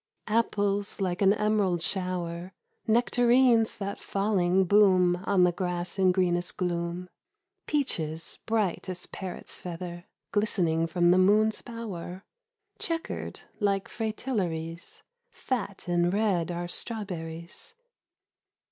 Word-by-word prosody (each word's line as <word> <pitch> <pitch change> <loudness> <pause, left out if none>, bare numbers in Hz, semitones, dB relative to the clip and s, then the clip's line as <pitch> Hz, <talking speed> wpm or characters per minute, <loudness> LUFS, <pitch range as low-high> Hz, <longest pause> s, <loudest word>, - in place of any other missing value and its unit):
Apples 205 -3 0
like 185 -1 -1
an 195 -1 +6
emerald 210 -4 +1
shower, 180 -1 -1 0.3
Nectarines 240 0 +4
that 200 0 -4
falling 190 -2 +2
boom 185 -2 +5
On 190 -2 +4
the 180 - +5
grass 180 +1 -3
in 185 -1 +5
greenest 180 -1 0
gloom, 175 -1 -2 0.6
Peaches 165 - -2
bright 210 -4 0
as 180 -1 -5
parrot's 190 -2 -7
feather 175 0 -7 0.3
Glistening 170 -6 +1
from 175 +1 +3
the 185 - +5
moon's 215 +3 +3
bower; 195 -6 -7 0.6
Chequered 330 -1 -3 0.2
like 200 -2 +1
fritillaries, 185 -8 -3 0.3
Fat 200 -7 -4
and 175 0 +2
red 195 -5 +1
are 175 0 -3
strawberries. 175 - -3
185 Hz, 105 wpm, -28 LUFS, 175-210 Hz, 0.6 s, an